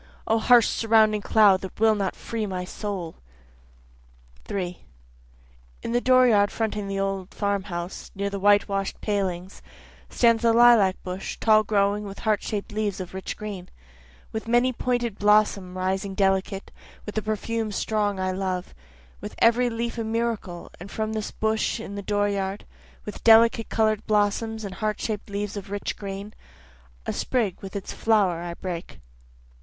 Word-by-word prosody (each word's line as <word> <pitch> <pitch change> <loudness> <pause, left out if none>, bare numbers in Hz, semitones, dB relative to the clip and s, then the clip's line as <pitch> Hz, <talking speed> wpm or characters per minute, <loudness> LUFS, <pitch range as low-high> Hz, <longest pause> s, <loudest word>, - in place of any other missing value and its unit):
O 225 +1 +2
harsh 235 0 +6
surrounding 220 -2 +3
cloud 200 -3 +5
that 190 - -8
will 220 0 +5
not 200 -3 -2
free 225 -2 -4
my 180 -2 -4
soul. 185 -4 -5 1.3
3 180 -3 -4 1.0
In - - -3
the 240 +1 +2
dooryard 245 -6 +5
fronting 210 -3 -3
an 195 - -2
old 195 -1 -3
farm 200 -2 -1
house 175 -1 -6
near 200 +1 -2
the 200 0 -4
white 205 +1 +4
wash'd 195 -1 -3
palings, 190 -3 -2 0.5
Stands 230 -2 +3
the 230 -1 +4
lilac 230 -5 +6
bush 185 +1 -5
tall 215 -1 +5
growing 205 0 +1
with 200 -1 -8
heart 215 -2 0
shaped 210 -1 -4
leaves 210 -2 -2
of 185 -1 -7
rich 190 0 -5
green, 200 -4 -7 0.6
With 220 0 -5
many 240 +2 +3
a - - -3
pointed 240 -3 -1
blossom 205 -3 +2
rising 190 +1 -2
delicate, 195 0 0 0.3
with 210 - -6
the 215 - -1
perfume 215 +1 -2
strong 205 -1 -1
I 185 0 0
love, 185 -1 -3 0.5
With - - -7
every 240 +2 +4
leaf 235 0 -3
a - - -1
miracle 220 -6 -3
and 180 +3 -9
from 220 +1 -3
this 215 -1 -3
bush 220 +1 -1
in 200 -3 -7
the 200 - -5
dooryard, 200 -1 -1 0.4
With 210 - -8
delicate 225 0 +6
color'd 215 -1 +1
blossoms 215 +1 0
and 195 - -6
heart 215 0 -2
shaped 215 -2 -4
leaves 200 0 -3
of 200 -1 -7
rich 205 0 -3
green, 200 +1 -7 0.7
A - - -2
sprig 225 -8 -1
with 195 +1 -9
its 200 - -5
flower 200 -7 +2
I 170 0 -5
break. 175 -2 -6
205 Hz, 160 wpm, -25 LUFS, 195-220 Hz, 1.3 s, harsh